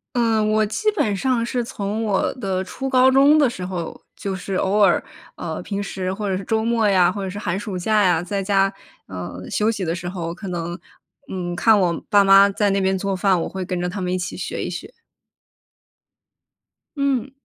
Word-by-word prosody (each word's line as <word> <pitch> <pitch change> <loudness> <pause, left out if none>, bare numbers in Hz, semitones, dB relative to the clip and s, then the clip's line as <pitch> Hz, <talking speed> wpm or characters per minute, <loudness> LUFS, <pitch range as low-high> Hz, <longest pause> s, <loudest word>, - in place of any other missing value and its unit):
嗯， 225 -3 +2
我 215 0 +3
基 430 - 0
本 210 - 0
上 245 +1 0
是 245 0 -1
从 210 -1 -4
我 200 -3 +1
的 190 -6 -2
初 270 +7 -5
高 260 0 +5
中 280 +3 +6
的 285 -4 +4
时 185 -6 -6
候， 180 -3 -5 0.2
就 195 -1 -4
是 190 +1 -5
偶 195 +3 +1
尔， 195 -4 +4 0.3
呃， 165 0 -5
平 200 +1 -3
时 185 -1 -3
或 205 0 -3
者 190 - 0
是 195 - -4
周 220 +2 0
末 230 -2 +2
呀， 185 -2 +4
或 205 - -5
者 190 - -3
是 200 - -6
寒 190 -3 -2
暑 205 -3 -5
假 210 +3 +2
呀， 175 -3 +3
在 195 +2 -3
家， 195 0 +2 0.4
嗯， 90 0 -7
休 215 +1 +1
息 205 -4 -3
的 165 - -1
时 175 0 -5
候， 170 -2 -4
可 195 +1 -8
能， 175 0 -4 0.5
嗯， 175 -2 -3
看 215 +4 +4
我 175 -3 0
爸 205 -2 +5
妈 195 +1 +7
在 200 0 +1
那 195 - +1
边 190 0 +1
做 195 +1 -2
饭， 185 -1 +2
我 - - -3
会 190 -1 -5
跟 180 0 -3
着 180 - -1
他 195 +2 -5
们 180 -1 -2
一 185 - 0
起 175 -1 -4
学 - - -4
一 - - -3
学。 - - -7 2.1
嗯。 275 -3 0
195 Hz, 230 characters per minute, -21 LUFS, 180-220 Hz, 2.1 s, 妈